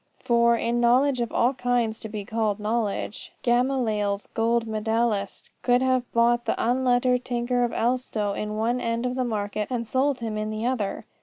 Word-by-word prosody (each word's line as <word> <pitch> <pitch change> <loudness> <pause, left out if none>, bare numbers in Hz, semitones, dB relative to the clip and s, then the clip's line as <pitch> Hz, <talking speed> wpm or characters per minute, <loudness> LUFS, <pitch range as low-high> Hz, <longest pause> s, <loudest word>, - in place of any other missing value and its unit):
For, 235 0 +3
in 235 +1 0
knowledge 255 +2 +3
of 235 - -2
all 245 +3 +2
kinds 245 -3 0
to 220 - -7
be 210 -2 -5
called 220 -1 -1
knowledge, 210 -1 -2
Gamaliel's 240 -5 +1
gold 230 +1 +1
medallist 220 -2 -1
could 245 +1 +3
have 255 -1 +1
bought 240 +1 +2
the - - 0
unlettered 250 0 +2
tinker 245 0 0
of 240 - 0
Elstow 230 -4 -1
in 210 +1 -4
one 235 +3 0
end 230 +1 -1
of 250 - -1
the 255 0 -1
market 210 -2 -2
and 235 -3 -3
sold 265 +3 +1
him 220 -2 -3
in 215 0 -2
the 215 +1 -3
other. 240 -6 -2
235 Hz, 175 wpm, -25 LUFS, 215-245 Hz, -, For